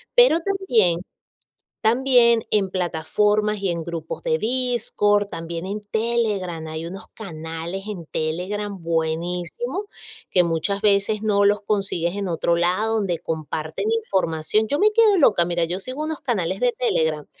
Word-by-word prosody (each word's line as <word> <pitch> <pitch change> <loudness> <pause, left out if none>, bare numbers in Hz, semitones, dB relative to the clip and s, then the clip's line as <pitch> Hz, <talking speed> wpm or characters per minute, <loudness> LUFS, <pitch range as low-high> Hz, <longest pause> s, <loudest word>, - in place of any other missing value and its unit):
Pero 485 -9 +6
también 250 - +1 0.8
también 235 -1 +4
en 200 -3 +2
plataformas 205 +5 +1
y 195 -2 -1
en 170 -1 -3
grupos 165 -1 -5
de 160 - +1
Discord, 220 -3 +1
también 165 +1 -5
en 205 +2 -4
Telegram, 205 -7 -1
hay 160 +1 -5
unos 190 +3 -8
canales 165 0 -6
en 180 -6 -6
Telegram 190 +7 -3
buenísimos, 175 - -2 0.4
que 180 -2 +4
muchas 170 +5 -1
veces 205 +1 +2
no 205 -1 +3
los 205 +1 +3
consigues 195 -4 -1
en 200 -2 -2
otro 170 0 +1
lado, 185 +6 +1
donde 185 -5 0
comparten 155 - -4
información. 210 - 0
Yo 285 - 0
me 425 +2 +4
quedo 430 -3 +5
loca, 210 - +5
mira, 170 0 0
yo 180 +3 -3
sigo 255 +8 -4
unos 315 -1 -3
canales 195 -8 -1
de 245 -1 +3
Telegram 160 -11 0
195 Hz, 145 wpm, -23 LUFS, 170-225 Hz, 0.8 s, Pero